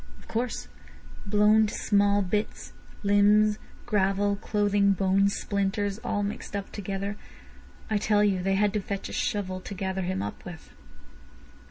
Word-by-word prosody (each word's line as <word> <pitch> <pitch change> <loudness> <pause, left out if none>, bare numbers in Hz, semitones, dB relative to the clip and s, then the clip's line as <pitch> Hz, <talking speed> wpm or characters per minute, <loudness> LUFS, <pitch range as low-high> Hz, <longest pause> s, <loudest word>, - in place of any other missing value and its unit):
"Of - - -18
course. 235 +2 -3 0.6
Blown 210 +1 +4
to - - -6
small 205 0 +2
bits: 210 +3 -3 0.3
limbs, 205 +1 +4 0.3
gravel, 200 -1 +1
clothing, 205 -1 +2
bones, 195 +1 +2
splinters—all 205 +1 -1
mixed 205 0 -5
up 200 -1 -4
together. 200 0 -4 0.7
I 215 -1 0
tell 210 0 +3
you 195 -3 +2
they 195 +1 +1
had 205 +1 +2
to 210 - +1
fetch 195 0 -5
a - - -8
shovel 200 -5 -2
to 200 - -7
gather 190 0 -2
him 185 - -2
up 100 - -6
with." 175 -3 -10
200 Hz, 145 wpm, -27 LUFS, 195-210 Hz, 0.7 s, Blown